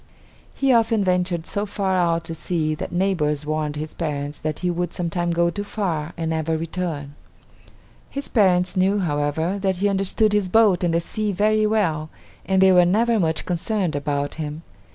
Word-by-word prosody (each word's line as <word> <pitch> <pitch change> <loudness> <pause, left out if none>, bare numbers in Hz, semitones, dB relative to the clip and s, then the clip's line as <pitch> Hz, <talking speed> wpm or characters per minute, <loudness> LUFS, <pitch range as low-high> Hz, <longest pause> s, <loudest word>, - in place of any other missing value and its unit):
He 270 -2 +2
often 225 -2 +3
ventured 180 -2 0
so 205 +2 -2
far 195 -1 -1
out 170 -2 +1
to 165 - -6
sea 160 -1 -1
that 155 - -5
neighbors 170 -5 0
warned 155 -1 -2
his 155 +1 -5
parents 145 -2 -4
that 155 -1 -4
he 180 -1 +1
would 175 0 -2
sometime 175 0 -2
go 170 0 +2
too 205 +3 -4
far 175 -6 -3
and 165 -1 -2
never 160 0 -1
return. 160 -3 -4 1.0
His 280 0 -2
parents 185 -5 +2
knew, 190 +2 +2
however, 160 +2 -1
that 190 -1 0
he 195 +3 +1
understood 200 +2 +1
his 205 -3 +1
boat 210 -4 +4
and 175 - +2
the 165 - +2
sea 210 +4 -2
very 215 +2 +2
well, 165 -8 0 0.4
and 190 0 +3
they 190 - +6
were 180 -1 +6
never 220 +6 +2
much 160 -3 0
concerned 180 -1 -1
about 145 0 -2
him. 150 +1 -5
175 Hz, 180 wpm, -22 LUFS, 160-200 Hz, 1.0 s, they